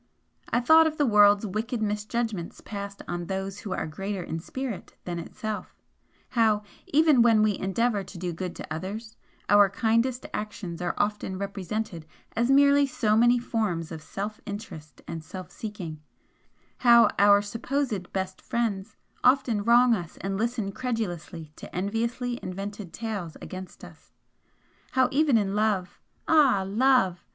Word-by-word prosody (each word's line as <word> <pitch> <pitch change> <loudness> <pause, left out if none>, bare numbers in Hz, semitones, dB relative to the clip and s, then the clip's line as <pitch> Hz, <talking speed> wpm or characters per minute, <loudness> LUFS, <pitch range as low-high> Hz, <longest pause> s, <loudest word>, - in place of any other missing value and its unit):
I 240 - +2
thought 320 +5 +7
of 310 -1 -3
the 290 - +3
world's 205 -2 +5
wicked 220 +4 -3
misjudgments 210 -2 -2
passed 200 -1 -7
on 175 -1 -4
those 195 +1 -4
who 205 - -7
are - - -2
greater 195 +4 -4
in 165 0 -4
spirit 250 +4 -6
than 175 -1 -3
itself, 210 +3 -6 0.5
how, 220 -3 +2 0.2
even 300 -3 +5
when 225 -2 +5
we 210 -2 +2
endeavour 205 +2 0
to 180 - -11
do 175 0 -3
good 180 +1 -5
to - - -6
others, 205 +7 -6 0.3
our 205 -1 +6
kindest 230 +5 +1
actions 205 -5 -5
are 175 -1 -1
often 205 -2 -1
represented 200 -3 -4 0.3
as 235 +2 +1
merely 280 +1 +5
so 215 -5 +1
many 240 +2 +5
forms 210 -9 -2
of 160 -1 -6
self 205 +6 -6
interest 200 -8 -8
and 165 -1 -6
self 185 +2 -9
seeking, 180 -8 -7 0.8
how 235 -2 +7
our 205 0 +6
supposed 230 -2 -2
'best' 190 -1 -3
friends 220 -3 -2 0.3
often 250 -5 +3
wrong 240 +2 +5
us 175 -6 -4
and 195 0 -2
listen 225 -1 -1
credulously 185 -9 -4
to - - -9
enviously 235 +6 -2
invented 195 0 -6
tales 205 -8 -5
against 185 0 -9
us, - - -14 0.8
how 260 -1 +3
even 285 -3 +4
in 200 -2 0
Love 210 -3 0 0.3
ah! 275 -11 +5
Love! 200 -5 +3
210 Hz, 145 wpm, -27 LUFS, 190-235 Hz, 0.8 s, thought